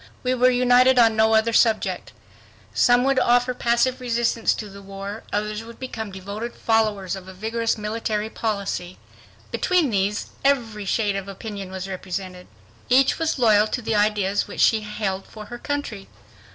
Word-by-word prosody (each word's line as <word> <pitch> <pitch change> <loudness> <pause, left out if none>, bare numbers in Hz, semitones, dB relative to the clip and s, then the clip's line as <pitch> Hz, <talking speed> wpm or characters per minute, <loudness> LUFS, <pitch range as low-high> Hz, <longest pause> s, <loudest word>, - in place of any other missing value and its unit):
We 255 0 +1
were 255 0 +4
united 250 +1 +4
on 225 -2 +5
no 220 0 +4
other 225 +1 +2
subject. 225 -1 +1 0.6
Some 245 0 +4
would 270 0 +2
offer 245 0 +3
passive 245 +2 +1
resistance 235 -1 +1
to 215 - -6
the 200 0 -12
war; 195 +2 -7
others 210 +1 -2
would 230 0 -12
become 220 -5 -6
devoted 200 +5 -6
followers 215 -4 0
of 190 -1 -10
a 190 - -10
vigorous 225 +3 -1
military 215 0 -2
policy. 200 -4 -3 0.5
Between 350 -8 +1
these, 200 +1 -1
every 230 -7 +1
shade 205 0 0
of 195 0 -4
opinion 200 -1 -7
was 190 0 -6
represented. 185 -1 -6 0.4
Each 265 +4 +4
was 325 -2 0
loyal 215 -4 +4
to 245 - -3
the 225 - -1
ideas 205 -1 +1
which - - -4
she 220 -1 +4
held 205 -2 -4
for 215 -1 -10
her 240 - -6
country. 285 -10 -4
220 Hz, 165 wpm, -23 LUFS, 200-240 Hz, 0.6 s, on